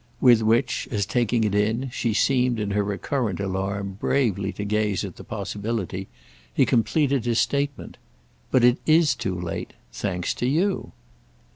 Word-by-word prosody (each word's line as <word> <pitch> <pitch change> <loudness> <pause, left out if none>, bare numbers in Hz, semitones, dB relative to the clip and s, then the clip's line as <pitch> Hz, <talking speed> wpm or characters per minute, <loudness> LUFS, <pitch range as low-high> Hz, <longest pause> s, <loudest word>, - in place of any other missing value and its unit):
With 120 -3 +6
which, 115 +4 +1
as, 105 -4 -1
taking 115 +2 +1
it 105 -2 0
in, 110 +5 0
she 120 -1 -1
seemed, 125 +1 +2
in 105 -1 -2
her 100 0 +1
recurrent 105 0 -2
alarm, 100 0 -3
bravely 100 -9 +1
to 105 +2 -5
gaze 105 -1 0
at 95 - -8
the - - -11
possibility, 100 -2 -4 0.4
he - - +3
completed 135 +1 +1
his 120 -1 +1
statement. 140 0 -1 0.5
"But 130 - +3
it 125 0 +5
is 155 -3 +5
too 100 -7 -3
late. 85 -1 -5 0.2
Thanks 90 -3 -2
to 120 - +2
you!" 180 +8 0
110 Hz, 155 wpm, -24 LUFS, 100-125 Hz, 0.5 s, With